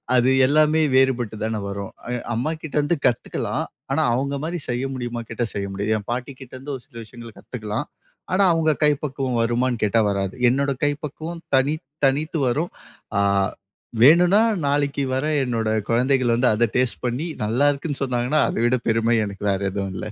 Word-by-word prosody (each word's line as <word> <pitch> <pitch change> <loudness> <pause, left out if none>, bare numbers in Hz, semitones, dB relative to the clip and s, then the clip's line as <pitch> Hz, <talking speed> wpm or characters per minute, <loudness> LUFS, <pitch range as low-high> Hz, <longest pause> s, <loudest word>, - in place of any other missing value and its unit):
அது 125 +2 +4
எல்லாமே 155 +3 +4
வேறுபட்டு 130 -4 +2
தான 110 -1 -1
வரும். 100 0 -6
அ - - -6 0.2
அம்மாகிட்டேருந்து 150 +4 -1
கத்துக்கலாம். 125 -3 0 0.3
ஆனா - - +2
அவங்க 140 +3 -1
மாதிரி 170 +3 -2
செய்ய 125 +2 -1
முடியுமா 120 -2 -4
கேட்டா, 120 - -2
செய்ய 100 -1 -3
முடியாது. 100 +3 -1
என் 105 - -7
பாட்டிகிட்டேருந்து 130 +2 -6
ஒரு 125 - -10
சில - - -26
விஷயங்கள 115 +1 -11
கத்துக்கலாம். 110 +3 -5 0.5
ஆனா 195 +2 +4
அவங்க 160 -1 +2
கை 150 - +6
பக்குவம் 135 -4 -2
வருமான்னு 120 +1 0
கேட்டா 110 +2 +3
வராது. 100 -1 -2
என்னோட 140 +2 +1
கை 145 - +3
பக்குவம் 160 +3 -7
தனித் 140 +2 +1 0.2
தனித்து 150 +5 -1
வரும். 150 +8 -1 0.5
அ - - +3 0.8
வேணும்னா 175 - +6 0.3
நாளைக்கு 140 -1 0
வர 135 - -1 0.2
என்னோட 115 -3 -1 0.2
குழந்தைகள் 125 0 +2
வந்து 125 +1 +3
அதை 115 +2 +2
டேஸ்ட் 130 -2 0
பண்ணி 130 +8 -2 0.2
நல்லாருக்குன்னு 140 +5 0
சொன்னாங்கன்னா, 125 +3 +1
அதை - - -2
விட 125 +1 +3
பெருமை 115 +1 +2
எனக்கு 100 -1 -8
வேற 95 - 0
எதுவும் 100 -1 -3
இல்லை. 105 - -5
130 Hz, 160 wpm, -22 LUFS, 115-145 Hz, 0.8 s, கை